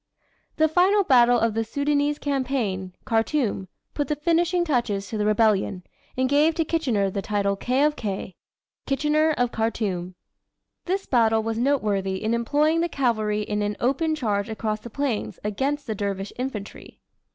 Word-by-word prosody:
The 315 - +3
final 370 +6 +3
battle 245 -6 +5
of 230 -1 +1
the 225 +1 0
Soudanese 285 +4 0
campaign, 250 -11 -2
Khartoum, 225 -4 0 0.3
put 290 - -2
the 300 - 0
finishing 345 +3 +1
touches 235 -9 -1
to 220 - -3
the 210 - +1
rebellion, 210 -4 +2 0.3
and 260 0 +2
gave 295 +4 +3
to 325 - 0
Kitchener 245 - 0
the 200 - -2
title 200 -1 0
"K. 255 +7 0
of 300 0 +2
K." 195 -3 -4 0.5
Kitchener 300 +3 +2
of 245 -1 +1
Khartoum. 195 -5 -2 0.7
This 385 +2 -1
battle 225 -3 +3
was 225 0 -2
noteworthy 210 -8 0
in 220 +2 0
employing 295 +7 +2
the 345 - 0
cavalry 215 -7 0
in 210 0 -2
an 205 0 -2
open 310 +6 +1
charge 210 -7 -1
across 215 -1 -2
the 235 - -10
plains 270 -3 -2
against 275 +8 -2
the 220 - -2
dervish 200 -1 -3
infantry. 240 -6 -6
235 Hz, 160 wpm, -24 LUFS, 210-290 Hz, 0.7 s, battle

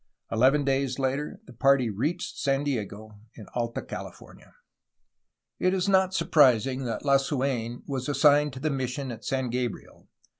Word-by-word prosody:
Eleven 130 +6 +3
days 135 -1 0
later, 135 +2 -2
the 125 - -13
party 135 +1 +3
reached 145 - -2
San 135 0 +1
Diego 110 -5 -4 0.2
in 110 - -10
Alta 120 -1 -2
Cahfornia. - - -10 1.1
It 185 +1 +2
is 185 +1 0
not 190 -1 +3
surprising 130 - +3
that 115 +4 -4
Lasuen 135 -4 0
was 135 -1 -4
assigned 145 0 +4
to 130 - -7
the 155 +3 -1
mis 130 -2 -2
sion 130 0 -5
at 110 -2 -9
San 130 +1 -2
Gabriel. 125 -2 -5
135 Hz, 150 wpm, -27 LUFS, 120-145 Hz, 1.1 s, assigned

